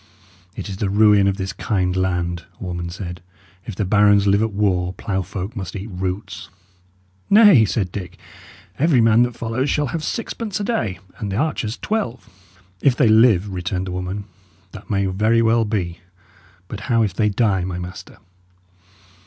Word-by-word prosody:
"It - - -6
is 95 -2 -6
the 100 -1 -1
ruin 105 -1 +5
of 100 0 0
this 95 -1 -4
kind 90 -3 -1
land," 90 -2 -1
a - - -8
woman 85 -1 -4
said. 85 -1 -7 0.5
"If 110 - -5
the 105 - -1
barons 100 +1 +4
live 100 +1 +3
at 110 0 0
war, 95 -3 0
ploughfolk 95 +2 -4
must 95 -3 -6
eat 100 +2 -6
roots." 95 +2 -5 0.8
"Nay," 200 - +7
said 95 -4 -1
Dick, 95 -2 -7 0.6
"every 150 -3 +4
man 115 0 +5
that 120 -1 +1
follows 120 +4 -2
shall 150 - +1
have 165 -2 -3
sixpence 225 +1 -4
a - - -2
day, 200 - -1 0.2
and 105 -4 -4
archers 125 -4 -1
twelve." 210 - -3 0.5
"If 135 -3 +3
they 125 -3 +3
live," 110 -4 +4
returned 90 +1 -3
the 95 - -5
woman, 90 +3 -4 0.5
"that 105 - -12
may 100 -1 +1
very 110 +5 +2
well 115 0 +3
be; 95 -5 -3 0.7
but 105 - -6
how 115 -2 +3
if 100 -5 -1
they 105 +2 +1
die, 100 -3 +1
my 90 -1 -4
master?" 90 0 -8
100 Hz, 170 wpm, -21 LUFS, 95-115 Hz, 0.8 s, Nay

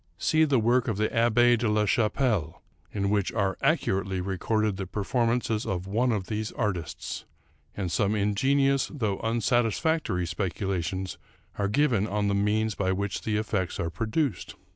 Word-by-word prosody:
See 160 0 +3
the 140 -3 +2
work 120 +3 +2
of 110 -5 -1
the 110 +1 +1
Ahh6 120 0 +4
de 115 -2 +1
la 105 0 +2
Chap 110 +1 +2
pelle, 105 - 0 0.3
in 100 -1 -1
which 100 -3 +1
are 100 -4 0
accurately 95 -1 +1
recorded 100 +3 0
the 95 -1 -4
performances 115 +2 0
of 90 -1 -3
one 115 +6 +1
of 105 -4 -1
these 110 +2 -3
artists, 100 -7 -3 0.5
and 95 -4 -2
some 100 +2 +1
ingenious 135 +7 +2
though 110 -10 -2
unsatisfactory 115 - +1
speculations 95 +1 -3 0.4
are 100 - +1
given 115 -2 +2
on 105 0 0
the - - +1
means 105 +2 +1
by 95 -1 0
which 100 0 -2
the 105 -1 -1
effects 105 -4 -2
are 85 - -2
produced. 115 - -2
105 Hz, 160 wpm, -27 LUFS, 95-115 Hz, 0.5 s, Ahh6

